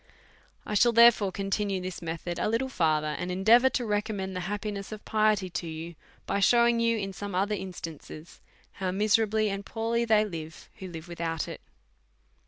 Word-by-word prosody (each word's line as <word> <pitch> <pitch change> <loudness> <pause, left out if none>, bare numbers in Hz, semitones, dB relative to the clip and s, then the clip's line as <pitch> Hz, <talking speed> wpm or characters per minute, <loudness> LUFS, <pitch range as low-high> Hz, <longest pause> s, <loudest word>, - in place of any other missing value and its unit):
I - - -4
shall, 235 +3 +4
therefore, 230 -4 +6
continue 195 0 -1
this 185 -1 -6
method 170 +1 -4
a - - 0
little 235 +4 0
fur 160 - +1
ther, 150 0 -3
and 180 +1 -3
endeavour 225 +8 +5
to 245 - -2
recommend 205 -3 -2
the - - -2
happiness 205 -1 -4
of 215 -1 -8
piety 215 -3 +2
to 170 - -4
you, 165 +1 -6 0.3
by 200 - -1
shewing 235 +3 +4
you, 230 0 +2
in 195 -2 -4
some 200 +1 -6
othei* 200 +2 0
instan 170 -5 -7
ces, 155 +2 -12 0.3
how 190 -2 -3
miserably 215 +2 +2
and 195 0 -4
poorly 230 +2 -1
they 215 -2 +3
live 160 -5 -8
who 190 - -6
live 165 -1 -9
with 170 -1 -8
out 165 -1 -2
it. - - -8
200 Hz, 190 wpm, -28 LUFS, 175-220 Hz, 0.3 s, therefore